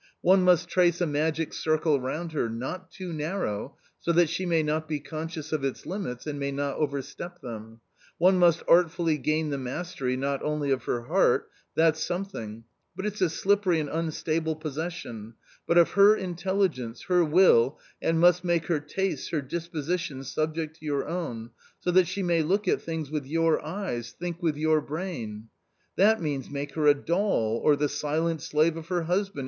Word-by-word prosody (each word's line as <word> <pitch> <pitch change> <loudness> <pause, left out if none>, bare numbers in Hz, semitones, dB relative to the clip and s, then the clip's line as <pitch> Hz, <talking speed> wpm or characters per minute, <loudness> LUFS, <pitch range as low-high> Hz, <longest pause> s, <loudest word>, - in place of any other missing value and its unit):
One 190 +2 +5
must 180 -1 +4
trace 175 -1 +3
a 175 - +2
magic 155 +1 -1
circle 155 -2 +1
round 160 +6 -3
her, 145 -7 -1
not 130 +11 -5
too 185 -3 -7
narrow, 150 - -3 0.2
so 170 - 0
that 170 -1 +4
she 185 +3 -2
may 165 -2 +2
not 155 +1 -1
be 155 -2 -2
conscious 155 +2 -6
of 150 -3 -1
its 135 -1 -3
limits 175 - -5
and 145 -2 -4
may 140 0 -2
not 140 0 -2
overstep 150 +4 -4
them; 115 -2 -8 0.4
one 185 +2 +4
must 170 -2 +4
artfully 165 -2 +3
gain 155 +3 0
the 140 - -2
mastery 130 -1 -3
not 140 +1 -1
only 150 -2 -1
of 130 - 0
her 120 - -1
heart - - +2
— - - -43
that's 160 -1 +3
something, 175 - -5 0.3
but 190 - -4
it's 210 -1 -3
a 180 - +4
slippery 190 0 +2
and 150 -2 -3
unstable 160 0 -1
possession 155 -8 -6
— - - -30
but 170 - +3
of 170 - +6
her 200 +2 +7
intelligence, 175 - -2
her 180 -1 +3
will, 150 -6 +4 0.2
and 165 0 +1
must 175 +1 +5
make 170 -2 +1
her 165 -4 +1
tastes, 185 +6 -3
her 160 - 0
disposition 165 -1 -3
subject 155 +3 -3
to 155 - -12
your 140 -2 -1
own, 135 -10 -4 0.3
so 180 - 0
that 180 0 +5
she 195 +1 -3
may 170 -2 +2
look 195 +6 0
at - - +2
things 160 -3 -4
with 150 -3 -3
your 165 +2 +2
eyes, 150 - -4
think 175 0 -4
with 160 -4 0
your 155 0 +2
brain." 120 - -5 0.2
" - - -44
That 220 +3 +4
means, 145 -5 -3
make 140 0 -5
her 150 -1 +1
a 145 - +7
doll, 145 - 0
or 150 - +5
the 145 +1 +1
silent 155 +3 -1
slave 155 +2 +2
of 165 -1 -8
her 175 0 0
_ - - -5
husband 190 -1 -1
160 Hz, 190 wpm, -27 LUFS, 145-175 Hz, 0.4 s, her